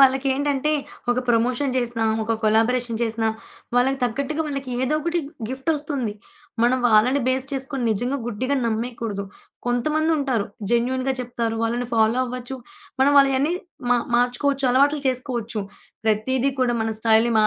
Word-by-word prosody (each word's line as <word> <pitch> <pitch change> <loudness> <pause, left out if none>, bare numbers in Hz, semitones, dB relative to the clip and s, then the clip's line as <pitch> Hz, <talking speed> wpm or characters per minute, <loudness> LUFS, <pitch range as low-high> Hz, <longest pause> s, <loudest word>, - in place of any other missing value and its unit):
వాళ్ళకేంటంటే 275 +2 +3 0.4
ఒక 245 - +1
ప్రమోషన్ 245 +4 +2
జేసినా, 240 -2 0 0.2
ఒక 225 +1 0
కొలాబరేషన్ 225 +2 +2
చేసినా, 225 -1 0 0.5
వాళ్ళకి 265 +2 +3
తగ్గట్టుగా 280 +6 -1
వాళ్ళకేదో 265 -1 -2
ఒకటి 340 +2 0 0.3
గిఫ్టోస్తుంది. 275 -3 -2 0.5
మనం 250 +2 +3
వాళ్ళని 240 +6 +4
బేస్ 260 0 0
చేసుకొని 270 -1 -3
నిజంగా 245 +6 -1
గుడ్డిగా 255 +5 -1
నమ్మేయకూడదు. 225 -3 -3 0.4
కొంతమందుంటారు 280 -2 +1 0.2
జెన్యూన్‌గా 255 +3 +1
చెప్తారు, 235 -2 -2
వాళ్ళని 240 +2 -1
ఫాలో 225 +2 +3
అవ్వచ్చు. 250 +1 -5 0.4
మనం 280 +2 +5
వాళ్ళయన్నీ 275 +3 +3 0.4
మా 245 - +6 0.2
మార్చుకోవచ్చు, 265 +3 +1
అలవాట్లు 285 +4 +3
చేసుకోవచ్చు. 240 -4 -2 0.4
ప్రతీది 255 +5 +1
కూడా 240 -1 +2
మన 225 - -1
స్టైల్‌ని 225 +1 +4
250 Hz, 120 wpm, -23 LUFS, 230-275 Hz, 0.5 s, మా